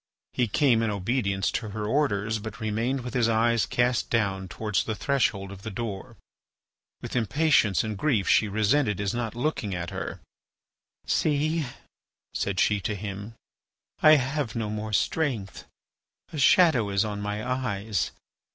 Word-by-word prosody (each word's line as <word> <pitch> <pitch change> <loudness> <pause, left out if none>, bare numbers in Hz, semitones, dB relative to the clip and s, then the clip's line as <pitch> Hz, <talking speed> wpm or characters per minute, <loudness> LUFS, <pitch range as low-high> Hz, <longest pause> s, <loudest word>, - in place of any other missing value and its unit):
He 125 - +1
came 120 +1 +3
in 115 - +1
obedience 100 -1 0
to 110 - -3
her 105 +1 -4
orders, 110 -4 0
but 110 +1 -8
remained 115 +4 -1
with 125 -1 -6
his 120 -2 +2
eyes 115 +1 +2
cast 120 0 +1
down 95 -5 0
towards 105 +2 -1
the 110 - -3
threshold 100 -7 0
of 95 -1 -10
the 110 - -5
door. 105 -2 -6 0.9
With - - -6
impatience 125 - +3
and 110 -1 -3
grief 125 -10 +1
she 110 - +4
resented 105 +2 +1
his 100 0 -1
not 120 -2 -3
looking 120 - -2
at 85 0 -4
her. - - -5 0.9
"See," 155 0 +1 0.7
said 100 -2 -1
she 105 -1 +3
to 105 +3 -2
him, 100 +2 -6 0.7
"I 155 0 +8
have 135 -3 -1
no 110 -2 -2
more 105 0 -4
strength, 115 -4 -1 0.7
a 155 - -3
shadow 135 - +5
is 100 +2 +1
on 105 -1 -4
my 105 +2 -3
eyes. 110 -5 -1
110 Hz, 150 wpm, -26 LUFS, 100-125 Hz, 0.9 s, I